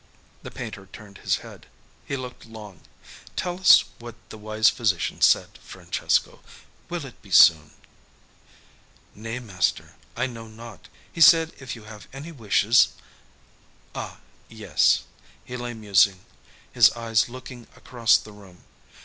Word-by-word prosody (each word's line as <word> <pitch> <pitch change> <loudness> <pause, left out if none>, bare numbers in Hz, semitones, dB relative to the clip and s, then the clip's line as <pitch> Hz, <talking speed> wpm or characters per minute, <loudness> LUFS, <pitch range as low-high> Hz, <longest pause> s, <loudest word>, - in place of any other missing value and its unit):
The - - -9
painter 110 -6 -9
turned 100 -2 -13
his - - 0
head. - - -14 0.4
He 140 - -3
looked 125 -2 -9
long. 105 -6 -12 0.5
"Tell 180 0 -4
us 190 - +7 0.2
what 120 -1 -10 0.2
the - - -10
wise 110 +1 +1
physician 100 -7 0
said, - - +2
Francesco. - - -2 0.5
Will 175 -4 -5
it 125 - -14
be 100 - -18
soon?" 80 -4 +6 1.4
"Nay, 115 +3 -7
master, 100 -8 -2 0.2
I 125 - 0
know 115 -3 -8
not. 115 +1 -13 0.3
He 165 - -6
said 165 +1 +6
if 130 -2 -7
you 115 - -13
have 105 -1 -13
any 145 +5 -9
wishes 115 - +2 0.5
" - - -33 0.3
"Ah, - - -7 0.3
yes." - - +1 0.4
He 125 - -8
lay 120 -1 -6
musing, 100 -3 +2 0.5
his - - +6
eyes 115 -1 0
looking 125 -1 -11
across 115 -2 +2
the 110 - -12
room. 95 -4 -17
115 Hz, 140 wpm, -24 LUFS, 105-125 Hz, 1.4 s, us